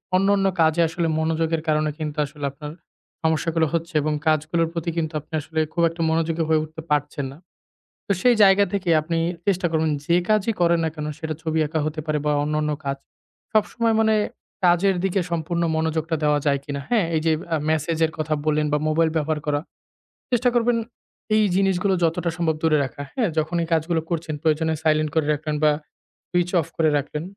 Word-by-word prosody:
অন্যান্য 195 +1 +3 0.2
কাজে 160 +1 +3
আসলে 170 +1 -1
মনোযোগের 160 0 0
কারণে 155 0 +2
কিন্তু 155 -2 -4
আসলে 145 0 -7
আপনার 150 +2 -8 0.5
সমস্যাগুলো 160 0 +1
হচ্ছে 165 +1 -2
এবং 155 +1 0
কাজগুলোর 160 +2 +2
প্রতি 170 0 -2
কিন্তু 160 -1 -1
আপনি 150 - -19
আসলে 160 +2 -4
খুব 170 - 0
একটা 165 +1 -7
মনোযোগী 165 0 0
হয়ে 155 -1 +3
উঠতে 155 +1 -9
পারছেন 145 -1 0
না। 140 - -12 0.7
তো 200 - +1
সেই 250 -1 +5
জায়গা 195 0 +6
থেকে 195 -3 -2
আপনি 165 +2 -2 0.3
চেষ্টা 185 -2 +2
করবেন 160 -1 +1 0.2
যে 170 - +3
কাজই 215 +1 +2
করেন 170 0 +4
না - - +1
কেন 150 -1 -5
সেটা 160 -1 -4
ছবি 160 -1 -1
আঁকা 160 +2 -2
হতে 155 0 -3
পারে 155 -1 0
বা 150 - +3
অন্যান্য 150 0 0
কাজ। 140 0 -1 0.6
সবসময় 225 +1 +2
মানে 220 0 +3 0.5
কাজের 180 +2 +4
দিকে 195 0 +1
সম্পূর্ণ 170 +1 -1
মনোযোগটা 160 0 -1
দেওয়া 150 -1 +3
যায় 140 -1 +3
কিনা? 140 -1 -4
হ্যাঁ, 220 -8 +3
এই - - +2 0.3
আ - - +3
মেসেজের 160 +1 +1
কথা 155 0 0
বললেন 150 0 +2
বা 150 - +3
মোবাইল 160 +1 +2
ব্যবহার 155 0 0
করা। 145 -1 +1 0.7
চেষ্টা 245 0 +2
করবেন 240 0 +3 0.6
এই 215 - +4
জিনিসগুলো 195 0 +2
যতটা 170 +1 0
সম্ভব 165 -2 +1
দূরে 155 -2 +3
রাখা। 135 +2 -7
হ্যাঁ 235 -6 +1
যখন 155 +2 0
এই 165 - -4
কাজগুলো 165 +1 +1
করছেন 165 -2 -2
প্রয়োজনে 160 0 +1
সাইলেন্ট 155 -1 +2
করে 160 -2 +2
রাখলেন 150 0 -2
বা 150 - +6 0.6
সুইচ 175 0 +1
অফ - - -8
করে 160 -1 +3
রাখলেন, 150 +2 -4
160 Hz, 185 wpm, -23 LUFS, 155-175 Hz, 0.7 s, জায়গা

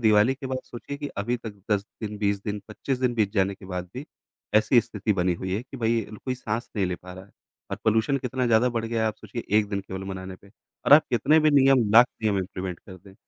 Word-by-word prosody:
दिवाली 110 +3 +4
के 135 0 -7
बाद 130 0 -2
सोचिए 135 +4 -8
कि 145 -1 -4
अभी 120 +5 0
तक 115 -3 -8 0.2
10 100 -1 +2 0.2
दिन, 105 -1 -4
20 100 -1 0
दिन, 105 -1 -3
25 125 +4 -3
दिन 125 -2 +1
बीत 105 -3 +1
जाने 95 0 +2
के 95 - -15
बाद 90 -1 -5
भी, 140 +5 -6 0.5
ऐसी 110 +3 +5
स्थिति 105 -2 -2
बनी 90 -2 +1
हुई 95 +2 -4
है 110 - -2
कि 135 +1 -11
भई 115 -1 +1
अ, 110 - -11
कोई 130 -1 -1
साँस 115 -1 -4
नहीं 95 -2 +1
ले 90 -1 -3
पा 90 0 -11
रहा 95 +1 -10
है। - - -23 0.4
और - - -2
पॉल्यूशन 110 +5 +2
कितना 125 0 -2
ज़्यादा 115 +2 +4
बढ़ 115 -2 -2
गया 115 0 -1
है - - +2
आप 110 - -4
सोचिए 110 +2 -7
1 105 -1 0
दिन 100 -1 -1
केवल 95 0 -7
मनाने 95 -1 -6
पे 100 - -20 0.4
और - - +6
आप 155 - +9
कितने 135 +7 +4
भी 155 - +4
नियम, 135 -5 +5
लाख 120 +2 +9 0.2
नियम 105 -3 +2
इंप्लीमेंट 90 -1 -4
कर 95 -2 -12
दें। 95 +1 -17
110 Hz, 260 wpm, -25 LUFS, 100-125 Hz, 0.5 s, आप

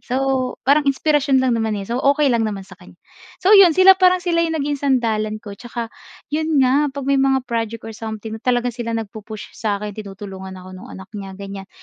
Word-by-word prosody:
So 260 0 -1
parang 285 +1 +3
inspirasyon 275 -1 +2
lang 255 - +2
naman, 225 -2 0
eh. 200 - -5
So 235 +5 -2
okey 280 0 +3
lang 235 - +2
naman 200 -2 -5
sa 195 - -18
kanya. 180 - -16 0.5
So 390 - +6
'yon 385 -6 +7
sila 375 +1 +9
parang 365 0 +5
sila 340 -1 +1
yung 325 -1 -1
naging 285 -1 -2
sandalan 225 -6 0
ko 205 - -7
'tsaka 235 +2 -7 0.4
'yun 315 0 0
nga 275 +3 +3
'pag 275 0 -6
may 275 0 +2
mga 270 -1 +2
project 230 -2 -3
or 225 - -7
something 220 0 -7
talagang 245 0 0
sila 230 -1 -3
nagpu-push 215 -1 -7
sa 210 -2 -2
akin 210 -1 -5
tinutulungan 195 -2 -8
ako 185 0 -11
nung 185 0 -11
anak 190 +2 -11
niya, 195 -2 -7
ganiyan. 195 -1 -8
235 Hz, 210 wpm, -20 LUFS, 210-275 Hz, 0.5 s, sila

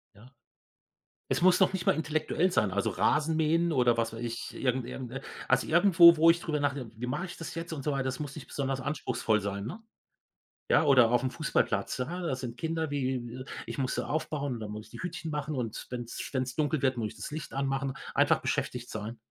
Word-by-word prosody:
Ja. 120 +6 -16 1.0
Es - - +1
muss 180 0 +5
noch - - +5
nicht 180 -2 -3
mal - - +5
intellektuell 160 +3 0
sein, 105 - +2
also, 100 +1 0
Rasenmähen 160 +2 +2
oder, 125 -4 +3
was 115 -1 0
weiß 115 - -7
ich, 120 0 -4
irgend 125 -1 0
irgend 125 -1 -6
äh, 135 - -5 0.3
also, 130 0 +2
irgendwo, 170 -1 +7
wo 165 +1 +6
ich 170 +1 +5
drüber 150 -3 -1
nachdenke: 140 -5 -2
„Wie 125 - -3
mache 175 +9 -2
ich 175 - -9
das 165 - -7
jetzt 165 0 -5
und 140 -3 -5
so 150 - 0
weiter“, 135 -1 0
das 130 +1 -3
muss 145 -2 -5
nicht 130 -5 -9
besonders 135 -1 -2
anspruchsvoll 125 -6 0
sein, 100 0 -3
ne? 175 - -6 0.9
Ja, - - +5
oder 130 -6 +6
auf'm 125 +1 +2
Fußballplatz, 150 -4 0
ah, 175 +7 -3
da 140 -6 0
sind 125 -2 -6
Kinder 160 -2 -2
wie, 130 -2 -2 0.2
ich - - -6
muss 130 -2 -1
sie - - -2
aufbauen 145 -1 -2
und - - -6
dann 105 -1 -6
muss 105 +1 -7
ich - - -21
die - - -10
Hütchen 175 -3 -4
machen 150 0 -3
und 115 -3 -4
wenn's 120 -1 -5
wenn's 130 -1 -1
dunkel 150 -2 0
wird, 130 -2 +2
muss 110 -2 -2
ich - - -15
das - - -7
Licht 155 +1 -6
anmachen. 135 -1 -1 0.2
Einfach - - +3
beschäftigt 125 -1 -2
sein. 110 +2 -5
135 Hz, 220 wpm, -29 LUFS, 125-155 Hz, 1.0 s, irgendwo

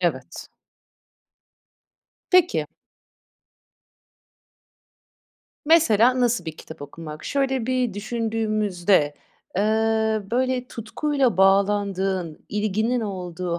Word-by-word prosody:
Evet. 155 -7 -3 1.8
Peki. 365 -1 +3 3.0
Mesela, 255 -6 +4
nasıl 240 -6 +1
bir 160 -1 -6
kitap 160 -2 -11
okumak? 155 +1 -9
Şöyle 265 -4 -1
bir 255 -5 0
düşündüğümüzde, 215 -7 0 0.4
eee, 195 - +2 0.7
böyle 255 +1 0
tutkuyla 255 - -1
bağlandığın, 195 -3 +1
ilginin 215 +4 0
olduğu 180 -4 -4
210 Hz, 70 wpm, -23 LUFS, 180-245 Hz, 3.0 s, Mesela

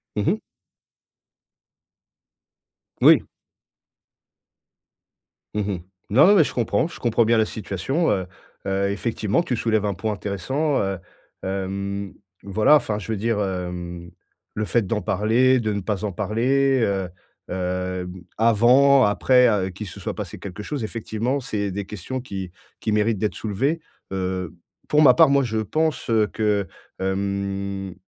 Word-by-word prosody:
Mmh - - -1
mh. - - +1 2.6
Oui. - - +7 2.3
Mmh 105 - 0
mh. 100 -3 -2 0.3
Non, 130 +9 +6
non, 205 - +7
mais, 175 - +7
je - - -5
comprends 115 +2 +1
je - - -11
comprends 115 -1 +2
bien 115 +1 +3
la 110 - +3
situation, 110 - -2
heu 95 -2 0 0.4
heu, 100 0 0
effectivement, 105 - 0
tu 130 - -1
soulèves 110 -2 +1
un 100 - 0
point 110 +3 -2
intéressant, 130 - -1
heu, 95 -1 -1 0.5
hem. 100 +1 -3 0.3
Voilà, 105 +8 +4
enfin, 110 -8 +1
je 105 - -6
veux 110 - -1
dire, 110 +1 0
hem, 90 -2 -4 0.4
le 105 - -2
fait 115 0 +1
d'en 105 +1 -1
parler, 115 +8 +3
de 110 -2 -1
ne 100 - -2
pas 105 +1 -2
en 105 - -2
parler, 130 +7 +1
heu 95 -3 -1 0.4
heu, 90 0 -3 0.3
avant, 125 +5 +5
après, 125 +5 +4
heu, 100 -4 +1
qui 100 +4 -7
se 95 - -10
soit - - -4
passé - - -6
quelque 100 +1 -7
chose, 140 +1 -4
effectivement, 115 +4 -2
c'est 105 -6 -3
des 100 +1 -4
questions 105 +7 -5
qui 95 -7 -6 0.3
qui 110 - -2
méritent 105 +1 +2
d'être 105 +2 -1
soulevées. 135 +10 -1 0.3
Heu, 95 -2 -3 0.3
pour 150 - +3
ma 140 -4 +8
part, - - +6
moi, 140 0 +4
je 110 -3 -2
pense 155 +10 -1 0.2
que, 105 -3 0 0.3
hem. 100 0 -2
105 Hz, 145 wpm, -23 LUFS, 95-120 Hz, 2.6 s, ma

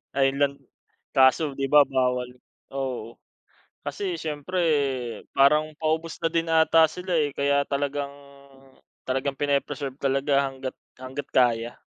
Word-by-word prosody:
Island 140 +1 +1 0.5
kaso, 135 +3 +4
'di 135 - 0
ba, 145 +1 +7
bawal, 125 -2 0 0.4
oo. 130 -4 -4 0.7
Kasi, 170 +5 -3
syempre 155 +3 -4 0.8
parang 150 +3 +4
paubos 160 +1 -1
na 165 - 0
din 165 -1 0
ata 160 0 +5
sila, 180 +2 -5
eh. 150 -2 +2
Kaya 140 +1 +1
talagang 140 0 -2 0.9
talagang 135 +1 -2
pini-preserve 140 -1 -1
talaga 140 0 +1
hangga't, 130 -1 -7 0.2
hangga't 130 +2 -7
kaya. 120 -2 +1
140 Hz, 115 wpm, -25 LUFS, 135-155 Hz, 0.9 s, ba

